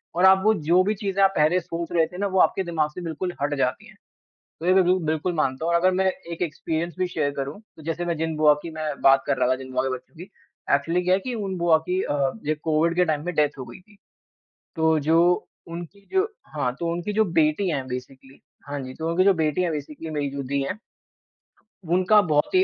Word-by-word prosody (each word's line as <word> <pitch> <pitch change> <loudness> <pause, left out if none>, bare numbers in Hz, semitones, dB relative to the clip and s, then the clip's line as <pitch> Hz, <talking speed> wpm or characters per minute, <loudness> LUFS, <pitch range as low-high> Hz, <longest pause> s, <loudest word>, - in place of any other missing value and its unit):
और 180 - +4
आपको 190 +3 +6 0.2
जो 180 +2 +5
भी 210 +3 +1
चीज़ें 195 -1 0
आप 195 - +5
पहले 155 +4 +3
सोच 170 0 -6
रहे 165 -2 +3
थे 180 - -11
ना, 200 +1 0
वो 190 -1 0
आपके 190 - +3
दिमाग 160 -4 -1
से 180 - -7
बिल्कुल 175 +2 -4
हट 145 +1 0
जाती 130 -2 -1
हैं। - - -18 0.6
तो 165 - -6
ये 185 - +4
तो 190 - +6
बिल 180 +1 +3
बिल्कुल 160 +3 -1
मानता 145 0 -1
हूँ 170 - +1
और 170 - +4
अगर 185 +2 +3
मैं 190 +1 +1 0.3
एक 170 - -6
एक्सपीरियंस 165 0 -3
भी 185 - +1
शेयर 150 -5 -1
करूँ, 140 +7 -4 0.2
तो 160 - -12
जैसे 165 +2 -2
मैं 170 -1 -1
जिन 160 0 -2
बुआ 150 -1 +6
की 170 - -5
मैं 155 - -3 0.2
बात 135 0 +5
कर - - +1
रहा - - +2
था, 130 - +3
जिन 130 0 -9
बुआ 130 - +1
के 135 - -1
बच्चों 130 - -14
की 170 - -9 0.5
एक्चुअली 165 +5 0
क्या 180 - +3
है 190 - +3
कि 255 - -2
उन 195 -4 -3
बुआ 170 -2 +4
की 185 +1 +1
अ, 140 -2 0
ये 155 +1 +1
कोविड 160 +1 +1
के 180 0 +3
टाइम 155 -2 -1
पे 180 - -1
डेथ 150 -1 0
हो 130 - -5
गई 120 - -11
थी। 205 +2 -23 0.8
तो 160 0 +3
जो 165 +1 +4 0.5
उनकी 175 +4 -9
जो 380 - +4 0.3
हाँ, 125 -5 0
तो 170 -1 -1
उनकी 175 +5 -3
जो 220 +1 +3 0.2
बेटी 155 +5 +1
हैं 135 -4 -2
बेसिकली। 130 +1 -8 0.3
हाँ 145 0 -4
जी, 130 -1 -7
तो 160 +3 -4
उनकी 185 +3 +2
जो 195 -1 +5
बेटी 160 +2 0
हैं 170 - 0
बेसिकली 150 +2 -6
मेरी 145 -2 -2
जो 140 0 -4
दीदी 140 +1 -1
हैं। 185 +9 -4 1.1
उनका 185 +5 +4
बहुत 150 - 0
ही 370 - +6
165 Hz, 245 wpm, -24 LUFS, 150-180 Hz, 1.1 s, आपको